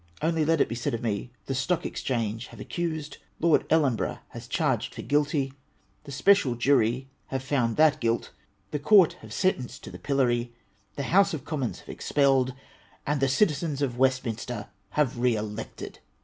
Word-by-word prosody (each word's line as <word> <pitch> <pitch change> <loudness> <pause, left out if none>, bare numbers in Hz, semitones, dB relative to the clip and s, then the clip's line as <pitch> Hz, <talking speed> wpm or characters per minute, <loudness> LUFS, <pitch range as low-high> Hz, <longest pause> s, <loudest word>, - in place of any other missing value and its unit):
Only 160 0 +1
let 165 +2 +2
it - - +4
be - - -4
said 115 0 -2
of 115 - -6
me: 110 +1 -2
— - - -40
the 135 - -2
Stoch 145 +7 0
Exchange 115 -2 -2
have 115 - -13
accused; 155 +2 -4 0.2
Lord 165 -1 +3
Ellenborourjh 145 -8 +2
has 120 0 -9
charged 130 -6 0
for - - -6
guilty; 145 -2 +1 0.5
the 140 - -8
Special 140 -3 +4
Jury 125 0 +2 0.2
have 135 -1 -3
found 125 -4 0
that 155 -1 +5
guilt; 115 0 0 0.4
the 150 - -1
Court 180 +1 +6
have - - -12
sen 185 0 +2
tenced 125 - -8
to - - -8
the - - -9
pillory; 120 -4 0 0.4
the 140 - -3
House 195 -2 +5
of 140 - -8
Commons 140 -7 -3
have - - -18
expelled; 135 -3 +2 0.5
and 145 0 0
the 135 - +3
Citizens 145 0 +1
of 125 -3 -2
Westminster 125 -4 0 0.2
have 130 0 0
re 125 -1 +3
elected. 105 +1 -6
135 Hz, 175 wpm, -27 LUFS, 120-150 Hz, 0.5 s, Court